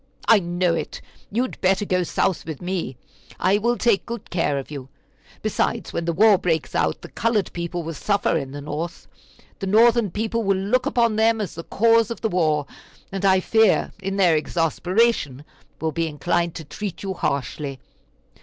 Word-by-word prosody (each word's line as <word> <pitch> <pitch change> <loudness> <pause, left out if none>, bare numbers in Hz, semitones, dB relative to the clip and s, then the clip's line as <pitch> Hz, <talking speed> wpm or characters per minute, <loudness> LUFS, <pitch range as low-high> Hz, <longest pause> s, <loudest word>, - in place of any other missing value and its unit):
I 225 - +7
know 175 -1 0
it. 165 - -4 0.3
You 235 +5 +1
had 255 - -6
better 190 +2 +2
go 185 -2 +1
South 180 +1 0
with 155 -4 -5
me; 175 -8 -3 0.4
I 195 +2 +3
will 235 +3 +1
take 230 -5 +2
good 235 -2 -7
care 155 -5 0
of 135 +2 -6
you. 135 -3 -7 0.5
Besides, - - -1
when 170 - -2
the 170 - +1
war 200 +3 +5
breaks 165 -3 -1
out, 80 -1 0
the - - -7
colored 220 -4 0
people 170 0 -4
will 165 +1 -5
suffer 200 +5 0
in 135 -4 -2
the 145 +1 -7
North. 150 +4 -5 0.5
The 195 - -3
Northern 225 +1 +4
people 220 +5 -2
will 195 -1 +2
look 205 +7 +1
upon 235 -3 +2
them 225 0 +3
as 205 -4 -3
the 165 - -7
cause 230 0 +3
of 235 - -6
the 220 - 0
war, 155 -5 +1 0.5
and 195 0 -4
I 190 -1 +4
fear, 220 0 +3
in 195 +1 -3
their 180 -4 +4
exasperation, 165 - 0 0.3
will 160 0 -1
be 165 +2 -1
inclined 170 +3 -1
to 160 - -6
treat 200 +6 -6
you 195 -1 -2
harshly. 140 -3 -3
185 Hz, 185 wpm, -23 LUFS, 160-215 Hz, 0.5 s, I